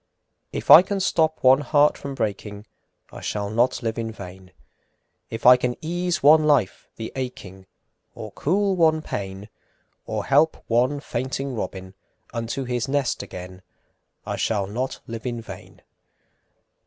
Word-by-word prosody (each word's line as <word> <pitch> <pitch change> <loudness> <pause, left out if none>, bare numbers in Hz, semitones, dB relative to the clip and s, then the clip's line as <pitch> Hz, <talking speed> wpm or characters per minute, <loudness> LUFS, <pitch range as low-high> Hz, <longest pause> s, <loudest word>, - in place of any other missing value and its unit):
VI. - - -5
If - - 0
I 165 - +12
can 195 +2 -3
stop 160 -4 +1
one 130 +1 +6
heart 145 0 +3
from 140 -1 -7
breaking, 105 -2 -4 0.5
I - - -10
shall 100 -1 -3
not 120 +3 +1
live 115 0 -2
in 115 -1 -3
vain; 95 -2 -11 0.8
If 115 - -7
I 125 +1 +9
can 125 -1 -2
ease 175 0 -2
one 155 +2 +7
life 135 -10 +1
the 110 - -6
aching, 95 -8 -7 0.5
Or - - -8
cool 195 +5 0
one 160 -2 +3
pain, 95 -3 -6 0.6
Or 110 -2 -3
help 150 +4 +3
one 125 +5 +1
fainting 135 +1 -4
robin 95 -3 -6 0.4
Unto 115 +3 -3
his 125 -2 -2
nest 135 -2 -1
again, 90 +1 -9 0.6
I - - -3
shall 100 -3 0
not 125 +7 -4
live 115 +1 -6
in 120 -1 -3
vain. 115 - -12
125 Hz, 150 wpm, -23 LUFS, 105-145 Hz, 0.8 s, I